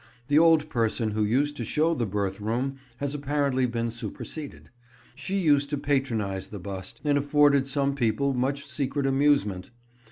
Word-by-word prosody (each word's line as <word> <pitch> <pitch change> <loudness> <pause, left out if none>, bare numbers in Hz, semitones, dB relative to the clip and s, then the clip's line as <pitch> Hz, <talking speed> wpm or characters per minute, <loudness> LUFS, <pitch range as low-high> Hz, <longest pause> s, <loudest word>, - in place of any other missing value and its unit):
The 145 +1 +5
old 160 -2 +5
person 115 -3 0
who 105 +1 0
used 140 +7 +1
to 120 - -3
show 155 +8 +1
the 120 -8 -1
birth 100 0 -2
room 125 +6 -2 0.2
has 140 +1 -3
apparently 140 -2 0
been 115 -1 -2
superseded. 140 +5 -7 0.4
She 185 +9 -3
used 145 -6 +3
to 145 - -1
patronise 115 -10 -1
the 105 - -8
bust, 95 0 -7
and 145 -1 +2
afforded 145 -1 +3
some 140 0 +1
people 135 +1 0
much 135 +3 -1
secret 140 +1 -2
amusement. 135 -9 +1
135 Hz, 160 wpm, -26 LUFS, 115-145 Hz, 0.4 s, The